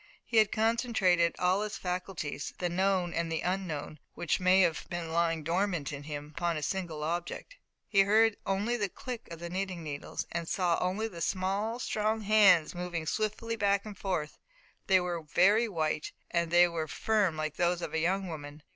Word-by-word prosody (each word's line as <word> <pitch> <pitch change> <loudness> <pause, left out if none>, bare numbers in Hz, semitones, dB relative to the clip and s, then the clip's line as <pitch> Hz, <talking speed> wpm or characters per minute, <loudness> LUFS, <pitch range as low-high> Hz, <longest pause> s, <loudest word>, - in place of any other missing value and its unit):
He 230 - -1
had 215 -2 +5
concentrated 215 -7 +2
all 180 +2 +2
his 210 0 -3
faculties, 180 -6 -4
the 180 - -1
known, 185 -1 +1
and 165 0 -1
the 160 - -1
unknown, 160 -5 -3 0.2
which 170 - 0
may 185 +1 +5
have 170 -3 +1
been 170 -2 -4
lying 165 -1 +1
dormant 170 -3 -1
in 145 - -6
him, 150 0 -7
upon 170 -2 0
a 150 - -4
single 170 -4 -3
object. 175 - -4 0.3
He 200 - +2
heard 215 +2 +4
only 205 +5 0
the 205 -4 -1
click 245 +4 -7
of 170 - -7
the 170 - -5
knitting 185 -1 -3
needles, 145 -2 -5
and 170 -1 -3
he - - -4
saw 175 -3 +1
only 190 +5 0
the 175 -6 -9
small, 195 +6 -1
strong 220 -2 -1
hands 200 -6 +5
moving 175 -2 -4
swiftly 215 +5 -2
back 200 -2 +1
and 210 -1 -7
forth. 180 -6 -3 0.5
They 190 -1 +5
were 175 -2 -2
very 200 +9 +3
white, 155 -4 -2 0.2
and 170 -1 +1
they 175 +1 +6
were 165 -2 -3
firm 205 -3 +1
like 155 -1 -3
those 175 0 +1
of - - -5
a 160 - +1
young 190 +4 0
woman. 150 -2 -8
180 Hz, 190 wpm, -30 LUFS, 165-200 Hz, 0.5 s, they